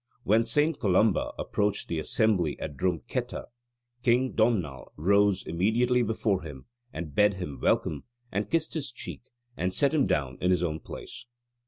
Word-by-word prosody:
When 115 +3 +3
St. 150 +6 +2
Columba 100 0 +2
approached 105 0 -1
the 85 - -2
assembly 90 -3 +1
at 70 - -5
Drum 90 0 0
ketta, 125 -1 -3 0.6
"King 125 +1 +3
Domnall 95 - 0
rose 100 +3 +3
immediately 115 +8 +2
before 110 -4 0
him, 75 -6 -9 0.3
and 80 -2 -6
bade 105 +4 +4
him 90 -7 -6
welcome, 75 - +1 0.3
and 105 +2 -2
kissed 165 -1 0
his 145 -5 -2
cheek, 120 - -7 0.3
and 90 +1 -1
set 140 +1 +3
him 150 -4 +3
down 65 -3 -1
in 90 - +2
his 90 -1 +2
own 80 -2 -1
place." 115 - -9
100 Hz, 160 wpm, -28 LUFS, 85-120 Hz, 0.6 s, bade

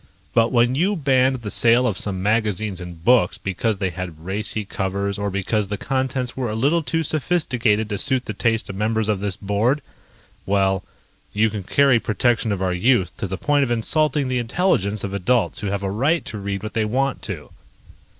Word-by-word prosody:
But 115 0 +3
when 120 0 +3
you 185 +9 +1
banned 130 -5 +2
the 105 - -4
sale 120 +2 +4
of 110 -6 0
some 95 -1 -3
magazines 105 -3 0
and 85 -1 -10
books 120 -7 +4
because 100 +3 -2
they 95 -2 -1
had 85 -2 -7
racy 105 +2 -2
covers 100 +1 -2
or 100 0 -1
because 100 +2 -1
the 105 +1 -3
contents 130 0 -2
were 130 -3 -2
a 105 - -3
little 145 +9 +2
too 165 +1 -1
sophisticated 125 -9 +1
to 105 -2 -3
suit 130 -2 +1
the 110 - -4
taste 115 +2 0
of 100 - -6
members 110 +1 0
of 105 -3 +1
this 100 -2 -2
board... 110 +8 0 0.6
well, 95 -1 +1 0.5
you 110 +1 +2
can 105 -1 -4
carry 135 +5 +3
protection 115 0 +1
of 95 -2 -2
our 90 -1 0
youth 95 -1 +2
to - - -3
the 95 +1 -4
point 145 +4 +2
of 135 - -1
insulting 145 +4 +1
the 130 -1 0
intelligence 115 - 0
of 100 -1 -4
adults 105 +5 +1
who 105 - -3
have 100 0 -2
a 95 - -1
right 140 +9 +1
to 105 - -6
read 100 0 -4
what 110 - -5
they 110 - +1
want 130 +5 -1
to." - - -7
110 Hz, 200 wpm, -22 LUFS, 100-130 Hz, 0.6 s, sale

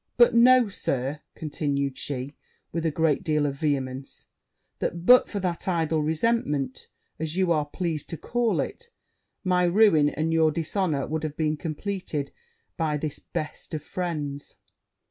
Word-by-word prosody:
But 240 0 +6
know, 245 0 +6
Sir,' 140 -6 -2 0.2
continued 140 -3 -2
she, 135 0 -5 0.4
with 165 0 -1
a - - +3
great 160 +1 +1
deal 150 -4 +1
of 140 - 0
vehemence, 135 -3 -2 0.5
'that, 170 0 -3
but 250 +3 +7
for 205 - -3
that 180 -2 -3
idle 165 -3 +1
resentment, 150 - 0 0.3
as 160 +1 -3
you 185 -2 +2
are 150 -3 +2
pleased 160 -2 -3
to 165 - -5
call 240 +4 0
it, 475 0 -6 0.5
my 180 -2 +2
ruin 175 -5 +5
and 160 +2 -1
your 160 -1 +4
dishonour 160 -2 -1
would 160 0 -2
have 155 -1 -4
been 155 -1 +1
compleated 160 -2 -4 0.5
by 155 -3 0
this 150 0 -4
best 155 +1 -5
of 150 - -5
friends.' 150 -5 -4
160 Hz, 150 wpm, -26 LUFS, 145-180 Hz, 0.5 s, but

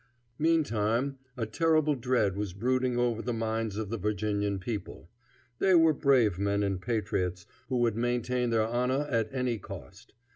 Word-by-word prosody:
Meantime 135 -5 +1 0.2
a 115 - -1
terrible 155 +5 +2
dread 120 -7 +1
was 100 -2 -3
brooding 125 +4 0
over 120 -2 +1
the 120 - -3
minds 110 -2 -2
of 110 -2 -3
the 115 - -2
Virginian 100 0 -1
people. 100 -3 -6 0.5
They 190 -1 +4
were 165 -2 +6
brave 125 - +3
men 100 0 +1
and 95 -2 -1
patriots, 90 -6 -2 0.2
who 130 - 0
would 120 -3 +2
maintain 120 +1 0
their 110 -1 +2
honor 125 +5 0
at 115 -3 +1
any 125 -4 -1
cost. 100 - -11
115 Hz, 155 wpm, -29 LUFS, 105-125 Hz, 0.5 s, were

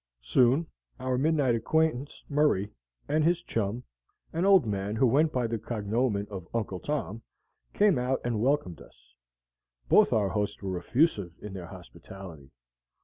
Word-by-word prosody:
Soon 130 - +3 0.3
our 130 0 -1
midnight 140 -2 +2
acquaintance, 145 +3 0
Murray, 140 -9 +1 0.4
and 155 +1 +1
his 175 +2 +2
chum, 115 - -2 0.5
an 170 +3 0
old 195 -6 +6
man 100 0 -2
who 120 - +3
went 150 +6 +3
by 125 -4 0
the 115 -1 -2
cognomen 110 0 -1
of 95 -4 -7
Uncle 100 -5 -2
Tom, 125 -6 -3 0.5
came 205 -9 +3
out 130 +2 0
and 115 -3 -1
welcomed 130 - 0
us; - - -19 0.8
both - - +5
our 105 -3 +2
hosts 105 +1 -2
were 95 -2 -2
effusive 105 - +1
in 105 -2 -8
their 90 -3 -7
hospitality. 90 -5 -12
115 Hz, 145 wpm, -28 LUFS, 100-145 Hz, 0.8 s, old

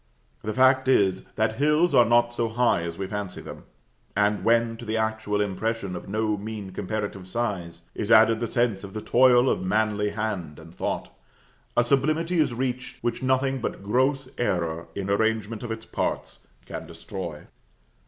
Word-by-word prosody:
The 110 0 -3
fact 130 0 +4
is, 100 -8 +3
that - - 0
hills 150 +5 +3
are 120 - +7
not 120 0 +3
so 115 -1 -1
high 120 -5 +2
as 85 0 -5
we 95 - -3
fancy 100 -1 -5
them, - - -10 0.5
and, 105 +1 +2
when 115 0 +3
to 120 - -9
the 110 -1 -2
actual 110 -2 -1
impression 105 -1 -2
of 90 - -8
no 110 0 0
mean 105 -2 -6
comparative 100 -1 -4
size, 90 -6 -3
is 105 - -3
added 110 0 +6
the 115 - -1
sense 115 -5 0
of 100 -1 -8
the 110 - -4
toil 125 +1 +5
of - - +1
manly 105 +2 +1
hand 100 -8 -3
and 80 +1 -13
thought, - - -3 0.6
a 120 - +6
sublimity 155 +7 +1
is 150 -5 +3
reached, 125 +1 -3
which 120 +1 -1
nothing 130 0 +1
but 100 - -4
gross 130 +6 +1
error 85 -7 -1
in 100 -1 -3
arrangement 110 +1 0
of 120 - -5
its 110 0 -5
parts - - -3 0.2
can - - -7
destroy. 85 -6 -7
110 Hz, 175 wpm, -25 LUFS, 100-120 Hz, 0.6 s, are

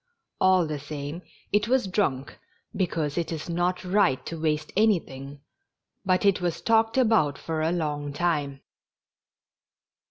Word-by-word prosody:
All 185 -2 +4
the 155 -2 -4
same 145 +3 -6 0.3
it 210 +2 +2
was 255 -2 +2
drunk, 165 -9 -1 0.4
because 165 -4 -1
it 170 - -3
is 160 -2 -5
not 175 +2 -1
right 180 -8 +2
to 165 -1 -6
waste 155 -1 -1
anything, 145 -10 0 0.6
but 185 0 +1
it 195 -2 +3
was 175 -2 -1
talked 225 +1 +2
about 220 - +3
for 160 -1 -3
a 160 +1 +1
long 150 -4 -2
time. 145 -4 -1
165 Hz, 135 wpm, -26 LUFS, 145-190 Hz, 0.6 s, All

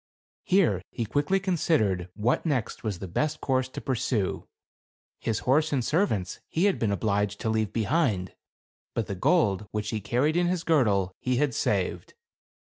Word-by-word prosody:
Here 175 - +3
he 115 - -3
quickly 145 - +1
considered 150 - +1
what 110 +4 +1
next 140 -9 -2
was 105 -5 -2
the 95 - -6
best 150 - -1
course 130 -1 0
to - - -6
pursue. 125 -6 -1 0.7
His 110 -2 -1
horses 150 +4 +2
and 130 -4 0
servants 130 - 0
he 170 +5 +1
had 200 - +2
been 110 -3 +1
obliged 105 0 0
to 110 - 0
leave 110 -2 0
behind; 110 - 0 0.6
but 115 - 0
the 100 - -4
gold, 105 - +2
which 105 -1 -3
he 110 - -2
carried 125 - +1
in 175 0 +2
his 175 -1 -1
girdle, 105 - +2
he 125 0 0
had 135 0 +1
saved. - - -1
120 Hz, 165 wpm, -27 LUFS, 105-155 Hz, 0.7 s, Here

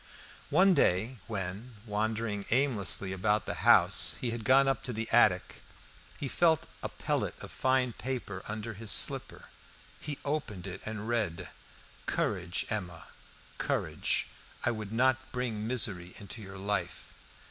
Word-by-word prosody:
One 185 +5 +5
day 110 - +2
when, 105 +3 -5
wandering 105 -1 -1
aimlessly 110 -7 +1
about 105 +3 +1
the - - -2
house, - - +5
he 120 - -2
had 115 -1 -4
gone 135 +4 +5
up 135 - +1
to 125 - -3
the 110 +1 -3
attic, 105 -6 +3 0.6
he 140 - -3
felt 160 +2 +3 0.2
a - - -3
pellet - - -2
of - - -9
fine 130 -2 +1
paper 120 -8 -4
under 110 +2 -4
his 110 +1 -5
slipper. - - +3 0.5
He 145 -1 -5
opened 130 - -3
it 95 - -6
and 110 0 -5
read: 100 -7 -1 0.6
"Courage, 90 -4 -1
Emma, 90 -6 -4 0.5
courage. - - 0 0.4
I 120 - +3
would 110 -3 -5
not 130 +3 +2
bring 115 -4 -2
misery 100 -8 -1
into 105 +3 -8
your 95 -1 -9
life." 100 +2 -3
110 Hz, 140 wpm, -31 LUFS, 100-125 Hz, 0.6 s, One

